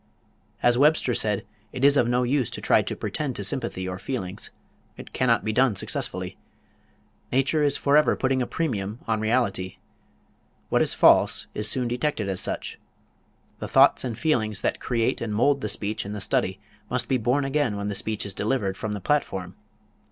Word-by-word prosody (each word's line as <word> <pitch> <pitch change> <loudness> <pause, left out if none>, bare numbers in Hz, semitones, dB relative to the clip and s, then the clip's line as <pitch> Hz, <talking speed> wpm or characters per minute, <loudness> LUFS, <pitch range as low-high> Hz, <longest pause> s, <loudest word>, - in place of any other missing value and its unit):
As 120 0 +4
Webster 145 -3 +3
said, 105 -3 0 0.3
it 130 +1 0
is 140 0 +6
of 125 -4 +3
no 125 +1 +2
use 130 -1 +1
to - - -6
try - - +3
to - - -4
pretend - - -3
to - - -3
sympathy 95 0 -2
or 90 0 -5
feelings. 100 -9 -4 0.5
It - - -11
cannot 120 -3 +2
be 110 - 0
done 130 -2 +3
successfully. - - -3 0.9
"Nature 135 +4 +2
is 145 -1 +2
forever 145 +2 +3
putting 130 0 0
a 125 - -1
premium 110 -10 -2
on 110 -1 +1
reality." 105 -5 0 0.9
What - - +2
is - - +2
false - - +5
is 105 0 -1
soon 125 0 0
detected 120 -3 -1
as 95 -1 -2
such. - - -3 0.8
The - - -4
thoughts - - +5
and 120 -4 -4
feelings 110 - 0
that - - -1
create 115 -2 -1
and 110 -3 -3
mould 140 +5 +2
the 105 - -2
speech 105 +1 -2
in 100 - -6
the 105 - -5
study 95 0 0 0.3
must 125 0 -1
be 130 -2 +1
born 125 +5 +1
again 135 -6 0
when 100 0 -3
the 105 - -2
speech 110 +1 -2
is 100 - -4
delivered 100 -2 -1
from 110 -1 -3
the 105 - -5
platform. 95 -11 -1
115 Hz, 185 wpm, -25 LUFS, 105-135 Hz, 0.9 s, is